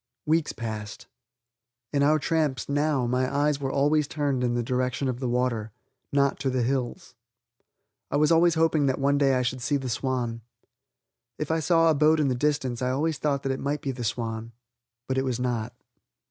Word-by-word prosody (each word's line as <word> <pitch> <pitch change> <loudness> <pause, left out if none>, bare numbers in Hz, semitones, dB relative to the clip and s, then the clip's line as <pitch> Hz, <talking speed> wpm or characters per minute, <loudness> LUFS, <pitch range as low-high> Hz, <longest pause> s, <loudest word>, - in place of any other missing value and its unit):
Weeks 160 0 +1
passed. 110 -2 -6 0.9
On 140 - +2
our 150 +2 +4
tramps, 150 -4 0
now, 145 -2 +1
my 125 +1 0
eyes 145 0 +1
were 135 -1 -2
always 145 +2 +2
turned 140 -4 -1
in 120 -1 +1
the 120 - 0
direction 125 +2 -1
of 125 -1 -2
the 130 -2 -2
water, 120 -3 -1 0.4
not 140 -1 +2
to 135 0 0
the 130 -1 0
hills. 125 -1 -2 1.0
I - - 0
was 150 +2 +3
always 170 +1 +5
hoping 160 -3 +2
that 130 - +1
one 140 +1 +2
day 135 -2 +3
I 125 - +1
should 125 +1 -2
see 145 +4 +1
the 130 -2 -5
Swan. 120 -1 -2 1.0
If 150 0 -3
I 160 - +1
saw 165 +1 +4
a - - +3
boat 155 +2 +4
in 145 -3 +2
the - - +1
distance 130 -2 -1
I 125 - 0
always 150 +4 -1
thought 140 -2 0
that 135 - 0
it 135 - -3
might 145 +1 -2
be 135 - -1
the 125 -2 -6
Swan. 115 0 -3 0.5
But 130 0 0
it - - 0
was 125 -2 -2
not. 120 -3 -2
135 Hz, 200 wpm, -26 LUFS, 125-150 Hz, 1.0 s, always